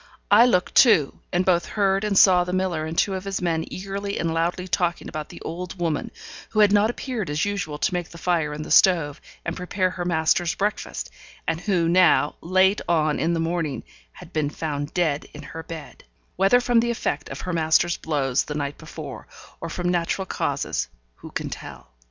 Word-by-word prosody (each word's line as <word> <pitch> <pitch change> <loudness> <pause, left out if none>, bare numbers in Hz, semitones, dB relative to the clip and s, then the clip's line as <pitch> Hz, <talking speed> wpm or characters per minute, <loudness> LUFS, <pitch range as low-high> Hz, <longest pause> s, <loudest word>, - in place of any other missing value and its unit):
I 225 +4 +8
looked 180 -7 +1
too, 200 - +5
and 180 +1 +1
both 175 -2 +2
heard 195 0 +2
and 205 -2 0
saw 180 -2 +7
the 180 +1 -4
miller 180 -4 -1
and 160 +1 -6
two 195 - +2
of 190 -1 -4
his 195 -1 -2
men 165 -2 0
eagerly 200 +1 -4
and 165 -1 -1
loudly 175 +3 -1
talking 175 -1 -1
about 155 -1 -6
the - - -11
old 175 +3 -6
woman, 165 -4 -1 0.4
who 215 - +2
had 205 -1 +6
not 210 +1 +4
appeared 240 - -4
as 150 +4 0
usual 200 -7 -3
to 165 - 0
make 175 -2 -2
the 170 - -12
fire 165 -3 0
in 150 +1 -5
the - - -8
stove, 165 -6 +4 0.2
and 170 - -2
prepare 185 0 -1
her 180 - -4
master's 170 0 +1
breakfast, 205 +2 -3 0.4
and 165 +1 -1
who 180 -3 +1
now, 175 -3 +4
late 190 +3 +3
on 155 -3 +2
in 165 +5 +1
the - - -1
morning, 165 -6 -2 0.3
had - - -14
been 155 -2 0
found 145 -1 -4
dead 160 -5 0
in - - -9
her 165 - -7
bed; 160 -2 -9 0.3
whether 195 +6 +4
from 245 -1 +3
the 235 +1 +1
effect 145 -10 -2
of 135 - -6
her 180 - -4
master's 165 +1 +2
blows 135 -5 0
the 150 - -5
night 145 -1 -3
before, - - -9 0.3
or 165 - -5
from 175 +2 -3
natural 175 +2 0
causes, - - -2 0.3
who - - -11
can - - -4
tell? 60 -1 -9
175 Hz, 200 wpm, -24 LUFS, 160-190 Hz, 0.4 s, I